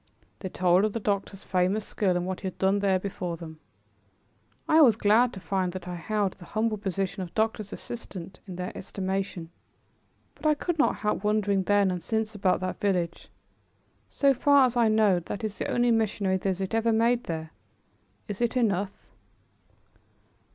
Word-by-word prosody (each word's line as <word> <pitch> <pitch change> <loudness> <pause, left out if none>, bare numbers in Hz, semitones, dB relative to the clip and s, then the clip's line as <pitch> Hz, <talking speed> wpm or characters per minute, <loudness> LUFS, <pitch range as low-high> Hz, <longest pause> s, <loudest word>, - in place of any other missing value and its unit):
They 185 - -5
told 180 +1 +3
of 215 -1 +1
the 230 - -2
doctor's 200 -2 -2
famous 185 +3 0
skill 185 -4 0
and 175 - -2
what 185 0 -3
he 195 - -4
had 185 - -6
done 195 +1 +2
there 195 -2 +2
before 180 -3 -4
them. 160 -2 -10 1.1
I 315 +1 +6
was 240 -8 +7
glad 225 +3 +4
to 190 - -7
find 185 0 -1
that 185 -1 -7
I 180 - -4
held 200 +3 -1
the 175 - -14
humble 215 +2 -1
position 195 0 -2
of 175 -2 -7
doctor's 215 -2 -1
assistant 190 -6 -8
in 185 - -7
their 180 +1 -5
estimation. 190 -3 -4 0.8
But - - -3
I 305 - +4
could 335 +2 -3
not 305 - +3
help 210 -1 0
wondering 205 -2 +2
then 200 0 +3
and 180 -1 -3
since 220 +1 -2
about 190 -3 +1
that 185 0 -3
village. 180 -4 -1 0.8
So 280 -1 +3
far 280 +1 +5
as 250 -1 -1
I 235 -2 +4
know 215 -4 +4
that 200 +6 -6
is 210 -2 -4
the - - -2
only 240 0 +2
missionary 210 -4 +1
visit 190 +1 -2
ever 225 +1 +2
made 235 +2 +2
there. 160 -1 -5 0.8
Is 205 +1 -5
it 240 +1 +1
enough? 200 -4 -1
200 Hz, 180 wpm, -27 LUFS, 185-220 Hz, 1.1 s, was